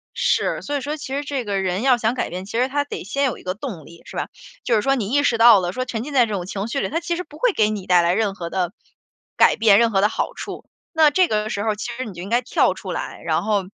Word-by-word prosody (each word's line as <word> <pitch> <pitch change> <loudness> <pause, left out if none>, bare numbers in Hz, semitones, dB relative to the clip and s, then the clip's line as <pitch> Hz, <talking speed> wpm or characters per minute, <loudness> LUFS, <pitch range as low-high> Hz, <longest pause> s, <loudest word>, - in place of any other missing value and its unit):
是， - - +1
所 290 - -4
以 280 - -1
说 295 +3 -4
其 265 -2 -7
实 285 - -2
这 275 -3 -3
个 200 -1 -1
人 185 +2 -1
要 260 -2 +4
想 225 0 0
改 255 - -2
变， 180 +2 -6
其 205 - -5
实 250 +2 +2
他 285 +2 0
得 290 - -7
先 275 +9 -1
有 255 - -1
一 - - -15
个 185 - -2
动 200 - -7
力， 170 +2 -15
是 - - -9
吧？ - - -2 0.4
就 235 - +2
是 210 - +2
说 270 +3 +2
你 215 -6 -3
意 285 +2 +3
识 235 -5 +2
到 230 -2 +8
了， 175 -1 -2
说 255 +6 -3
沉 230 -3 -4
浸 295 +3 -7
在 250 -3 +5
这 215 - -5
种 185 -3 -3
情 195 +2 -4
绪 255 +4 -2
里， - - -1
它 330 - -1
其 345 0 -2
实 360 - -4
不 300 -3 -15
会 - - +2
给 215 -7 +2
你 205 -3 -4
带 180 -1 +5
来 170 +1 +2
任 210 -1 0
何 170 -3 -6
的 180 -1 -2 0.6
改 - - +5
变、 215 -2 +5
任 230 -1 +3
何 195 -2 +2
的 210 - +4
好 - - -2
处。 - - -8 0.3
那 315 -2 +5
这 365 +4 +3
个 215 -3 -1
时 200 - -2
候 215 -1 0
其 225 +3 -5
实 255 +1 -5
你 210 - -8
就 175 - -8
应 195 - -7
该 240 +2 +2
跳 250 - +2
出 - - -7
来， - - -5
然 - - 0
后， 210 -2 +1
225 Hz, 335 characters per minute, -21 LUFS, 195-275 Hz, 0.6 s, 到